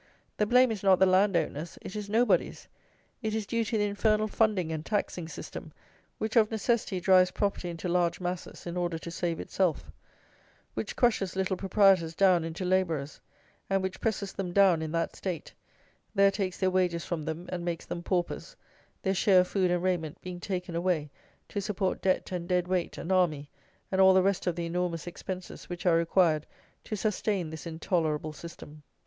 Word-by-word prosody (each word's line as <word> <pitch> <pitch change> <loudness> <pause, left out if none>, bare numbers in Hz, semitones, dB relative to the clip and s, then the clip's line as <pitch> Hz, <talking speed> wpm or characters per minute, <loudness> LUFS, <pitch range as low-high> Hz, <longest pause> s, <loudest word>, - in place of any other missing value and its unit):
The 210 - +1
blame 250 +1 +5
is 210 -3 -4
not 190 -2 +5
the 190 - +5
land 190 0 +4
owner's; 165 0 -3
it 190 - -7
is 210 -1 -5
nobody's; 230 +4 +1 0.5
it 220 -2 -2
is 220 -2 -2
due 230 +2 0
to 220 +1 -1
the 210 - +2
infernal 215 +1 +1
funding 205 -6 +1
and 155 -1 -3
taxing 180 -4 -2
system, 155 +1 -8 0.5
which 220 +2 -3
of 220 -2 +5
necessity 220 -3 0
drives 185 0 +5
property 200 -2 -2
into 170 +1 -5
large 175 -1 +1
masses 180 -1 -5
in 175 0 -4
order 175 -2 -1
to 170 +1 -8
save 170 -1 -2
itself; 160 - -1 0.8
which 110 -1 -4
crushes 215 -7 +1
little 190 0 0
proprietors 190 -4 +3
down 185 -3 +4
into 165 +3 -4
labourers; 165 -6 0 0.5
and 195 -1 +1
which 190 0 -4
presses 200 -3 -1
them 180 -3 -4
down 190 -4 +5
in 160 -1 -3
that 165 0 -1
state, 180 -4 -5 0.6
there 200 0 +5
takes 195 -2 -2
their 190 -1 +2
wages 180 -2 +1
from 170 -3 -3
them 160 +3 -5
and 180 -1 -3
makes 170 -1 -3
them 170 - -5
paupers, 180 - -2 0.5
their 190 - +1
share 190 -1 +5
of 180 - -2
food 185 -3 +1
and 175 0 0
raiment 170 -5 -1
being 180 -1 -6
taken 180 -2 -4
away 170 -4 0 0.4
to 205 - -3
support 195 -1 -1
debt 185 0 +1
and 175 -1 -4
dead 180 -1 +1
weight 180 -2 -1
and 170 - -4
army 160 -6 +2 0.4
and 190 0 +3
all 190 0 +7
the 190 - +5
rest 195 -1 0
of 175 - +1
the 170 -1 -3
enormous 170 -1 -2
expenses 180 +1 -7
which 175 0 -6
are 175 -2 +5
required 165 -2 +2 0.4
to 215 - -4
sustain 200 -4 -1
this 160 +1 -7
intolerable 160 -2 -1
system. 155 -1 -11
180 Hz, 190 wpm, -29 LUFS, 170-195 Hz, 0.8 s, all